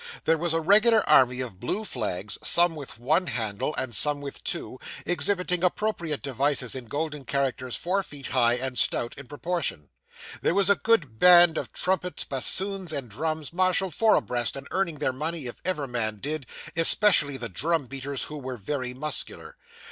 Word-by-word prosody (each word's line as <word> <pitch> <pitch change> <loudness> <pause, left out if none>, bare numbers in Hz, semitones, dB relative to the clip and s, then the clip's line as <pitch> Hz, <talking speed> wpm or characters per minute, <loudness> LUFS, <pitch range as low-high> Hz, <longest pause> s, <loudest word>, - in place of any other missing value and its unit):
There 165 - +4
was 170 0 -1
a 165 0 +1
regular 215 +6 +4
army 125 0 +4
of 115 -8 -6
blue 185 - -3
flags, 105 - -3
some 175 -1 +5
with 140 -7 -9
one 155 +10 +1
handle, 115 +4 -2
and 120 -4 -1
some 145 +6 +4
with 140 -1 -8
two, 170 -8 -5 0.3
exhibiting 180 +2 0
appropriate 175 -6 -1
devices, 135 -1 0
in 130 -2 -5
golden 150 +3 -4
characters 130 -2 -2
four 190 +3 0
feet 145 -7 -11
high, 120 -2 +3
and 130 0 -3
stout 120 - 0
in 140 -2 -11
proportion. 150 - -3 0.5
There 170 - +1
was 200 0 +4
a - - +5
grand 160 - 0
band 175 -2 +7
of - - -4
trumpets, 180 -1 -2
bassoons, 190 +7 0
and 140 -5 -4
drums, 155 +5 -4
marshalled 185 0 +1
four 220 +6 +4
abreast, 120 -1 -1
and 135 0 -8
earning 185 -4 -1
their 140 -3 -1
money, 155 +2 -4
if 120 - -8
ever 180 -6 -1
men 115 -4 -2
did, 145 +3 -4 0.3
especially 165 -4 +4
the 120 - -4
drum 160 - -1
beaters, 135 +1 -4
who 150 0 -7
were 130 -2 -6
very 125 +3 -4
muscular. 150 +2 -2
145 Hz, 175 wpm, -26 LUFS, 130-175 Hz, 0.5 s, band